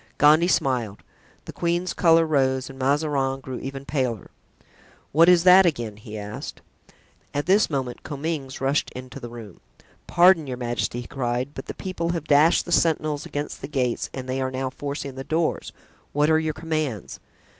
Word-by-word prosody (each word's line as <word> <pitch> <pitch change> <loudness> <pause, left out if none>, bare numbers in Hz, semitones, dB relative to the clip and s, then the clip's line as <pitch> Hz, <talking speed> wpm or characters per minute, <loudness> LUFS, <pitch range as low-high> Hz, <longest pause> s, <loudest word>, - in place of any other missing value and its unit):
Gondy 155 +3 +5
smiled, 125 - 0 0.4
the - - -8
queen's 175 +1 -1
color 165 -1 +4
rose 130 -4 +1
and 135 - -13
Mazarin 135 -1 0
grew 130 -2 -7
even 135 0 -7
paler. 130 -7 -2 0.8
"What 165 +4 +6
is 175 -2 +5
that 185 +1 +8
again?" 120 - -1
he 105 0 -9
asked. 105 +1 -7 0.7
At 145 - -1
this 195 +4 +4
moment 130 -5 -3
Comminges 145 -2 -4
rushed 135 +3 0
into 130 0 -8
the 120 - -8
room. 115 -6 -11 0.5
"Pardon, 175 -3 +5
your 125 -1 -4
majesty," 120 -1 -2
he 120 - -10
cried, 125 +1 -2
"but - - -8
the - - -6
people 175 -3 -3
have 165 -3 -3
dashed 155 +2 +4
the 175 - -7
sentinels 155 -3 +1
against 145 +1 -5
the 135 - -5
gates 130 -5 -1
and 130 -1 -7
they 130 +1 -2
are 130 - -1
now 130 0 -3
forcing 140 -1 -5
the 135 +1 -7
doors; 160 +3 -1 0.4
what 150 +2 +3
are 160 - +4
your 160 -1 -2
commands?" 155 - -3
140 Hz, 175 wpm, -24 LUFS, 130-160 Hz, 0.8 s, that